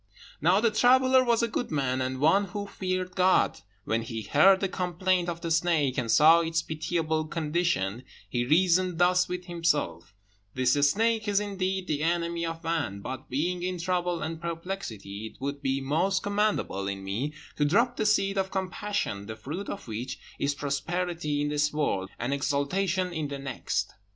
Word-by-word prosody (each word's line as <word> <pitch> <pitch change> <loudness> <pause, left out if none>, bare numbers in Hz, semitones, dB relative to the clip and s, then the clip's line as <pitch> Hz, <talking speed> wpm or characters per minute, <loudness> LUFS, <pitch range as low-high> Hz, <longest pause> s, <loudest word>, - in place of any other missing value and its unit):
Now 180 +6 +4
the 230 0 +2
traveller 255 +3 +5
was 235 -2 +2
a - - +2
good 235 +2 -3
man, 130 -3 0
and 130 0 -2
one 165 +8 +4
who 200 +2 -5
feared 185 -2 -3
God. 185 0 +3 0.2
When 115 +2 0
he 115 -1 -5
heard 190 - +5
the 195 - 0
complaint 180 0 0
of 170 -1 -5
the 165 - -3
snake, 160 -5 +2
and 125 -4 -2
saw 160 +7 +7
its 165 -1 0
pitiable 160 0 -1
condition, 155 - -1 0.2
he 120 -1 -1
reasoned 180 +5 +3
thus 180 +1 +3
with 180 0 -4
himself: 165 - -1 0.4
"This 130 -1 +3 0.2
snake 225 +4 +1
is, 205 -1 +3
indeed, 190 -2 -2
the 150 -4 -2
enemy 170 0 0
of 165 0 -6
man, 160 -12 -2
but 130 +4 -7
being 175 +7 -1
in 180 0 -2
trouble 175 -1 -1
and 160 +1 -4
perplexity, 165 - -5
it - - -15
would 140 +1 -4
be 135 -1 0
most 165 +8 +1
commendable 205 - 0
in 100 -1 -4
me 115 +10 -3 0.2
to 150 - +2
drop 230 +11 +3
the 215 - 0
seed 195 -1 +2
of 190 0 -1
compassion, 190 - -3
the 110 - -5
fruit 150 - -6
of 200 - -6
which 115 +3 -5 0.2
is 140 0 0
prosperity 150 +2 -2
in 145 - 0
this 150 0 +1
world, 100 -11 -1
and 120 +4 -2
exaltation 170 +6 0
in 155 -3 -2
the 140 0 -5
next." 135 -1 -3
165 Hz, 175 wpm, -28 LUFS, 140-185 Hz, 0.4 s, saw